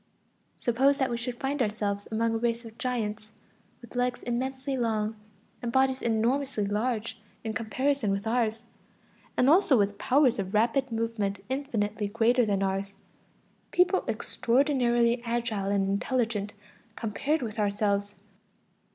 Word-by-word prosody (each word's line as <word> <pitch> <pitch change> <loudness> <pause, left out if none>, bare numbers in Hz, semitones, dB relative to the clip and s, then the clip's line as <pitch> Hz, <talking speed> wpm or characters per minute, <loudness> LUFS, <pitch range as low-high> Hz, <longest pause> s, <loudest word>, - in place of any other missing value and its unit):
Suppose 270 +4 +3
that 265 -3 0
we 235 - -1
should 240 +1 -5
find 275 +1 -1
ourselves 205 -2 -1
among 225 +1 +1
a - - +1
race 235 0 -1
of 225 +1 -12
giants, 215 -4 -3 0.5
with 240 - -13
legs 245 0 0
immensely 265 +3 -2
long 220 -3 0 0.5
and 240 -2 -2
bodies 265 +1 +2
enormously 235 +1 +1
large 220 +1 -2 0.2
in 220 -1 -3
comparison 245 +2 0
with 195 +2 -1
ours, 225 -1 0 0.7
and 250 - +4
also 310 -3 +5
with 200 -1 +1
powers 260 -4 +3
of 195 +1 -3
rapid 240 +4 +2
movement 220 -4 -2
infinitely 220 -6 -1
greater 230 +3 +3
than 200 -1 +1
ours, 195 +1 -2 0.7
people 360 +1 +3
extraordinarily 240 -2 +2
agile 230 -4 -1
and 200 -1 +1
intelligent 210 0 -1 0.4
compared 270 +7 -1
with 220 -1 -5
ourselves. 205 0 0
230 Hz, 135 wpm, -28 LUFS, 210-255 Hz, 0.7 s, also